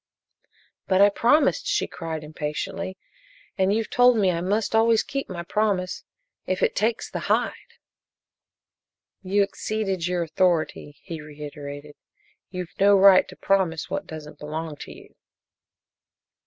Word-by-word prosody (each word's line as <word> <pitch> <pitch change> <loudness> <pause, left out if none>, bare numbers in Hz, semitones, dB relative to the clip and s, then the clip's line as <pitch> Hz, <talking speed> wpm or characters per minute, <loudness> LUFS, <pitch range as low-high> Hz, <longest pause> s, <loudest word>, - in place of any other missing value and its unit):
"But 185 -1 +3
I 200 +1 +7
promised!" 295 - +2
she - - +1
cried, 160 -2 -6
impatiently. 155 +5 -4 0.6
"And 190 0 +2
you've 220 +1 -1
told 245 -1 +5
me 195 -3 +3
I 170 -1 -2
must 205 +5 0
always 225 0 +4
keep 275 0 -4
my 175 -2 -5
promise, 195 -1 -1 0.4
'if 185 - -1
it - - +2
takes 220 +3 0
the - - -5
hide'!" - - -1 1.5
"You 200 +2 +2
exceeded 195 -3 -2
your 180 -1 0
authority," 160 -3 0
he 165 -4 -7
reiterated. 145 -1 -9 0.6
"You've 180 -2 -6
no 200 0 +6
right 195 -1 +7
to - - -12
promise 185 -5 0
what - - -3
doesn't 150 -2 -9
belong 155 +1 -5
to - - -9
you." - - -14
185 Hz, 135 wpm, -24 LUFS, 160-205 Hz, 1.5 s, I